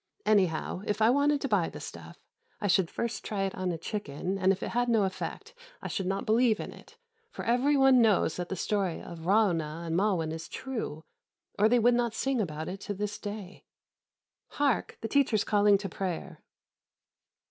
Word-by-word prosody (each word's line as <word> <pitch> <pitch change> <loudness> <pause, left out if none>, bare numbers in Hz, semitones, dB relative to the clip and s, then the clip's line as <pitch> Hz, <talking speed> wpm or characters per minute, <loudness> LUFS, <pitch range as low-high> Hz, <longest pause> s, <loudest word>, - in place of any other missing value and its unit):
Anyhow, 185 -4 +1
if 210 - -1
I 220 +2 +5
wanted 285 +1 +2
to - - -1
buy 200 -8 +1
the - - -9
stuff, - - -10 0.3
I - - -4
should 190 -3 +3
first 235 -2 -3
try 200 -2 -2
it 195 - -2
on 185 -1 -2
a 165 - -3
chicken, 180 -1 -4
and 190 0 +4
if 195 - -2
it - - -3
had 245 0 0
no 225 -3 +3
effect 410 - -4 0.3
I - - -6
should 190 -3 -2
not 195 +1 -2
believe 225 0 +3
in - - -6
it, 465 - -16 0.3
for - - -7
every 255 +5 +3
one 270 -2 +6
knows 210 -7 +3
that 180 -1 -4
the - - -2
story 195 -4 -1
of 170 - -9
Ra'ûnah 170 -5 +1
and 165 0 -2
Ma'win 180 -4 +1
is 160 +1 -6
true, 225 - -5 0.6
or 215 +2 +5
they 245 - +4
would 240 +1 +4
not 235 -2 0
sing 270 -3 0
about 155 -4 -4
it 190 +2 -5
to 205 0 -5
this 210 +1 -4
day. 205 -2 -7 0.8
Hark! 285 -4 0
the 225 - -2
teacher 275 -3 +2
is 210 - +2
calling 205 -1 +4
to 195 0 -5
prayer." 185 -2 -5
205 Hz, 200 wpm, -29 LUFS, 180-235 Hz, 0.8 s, one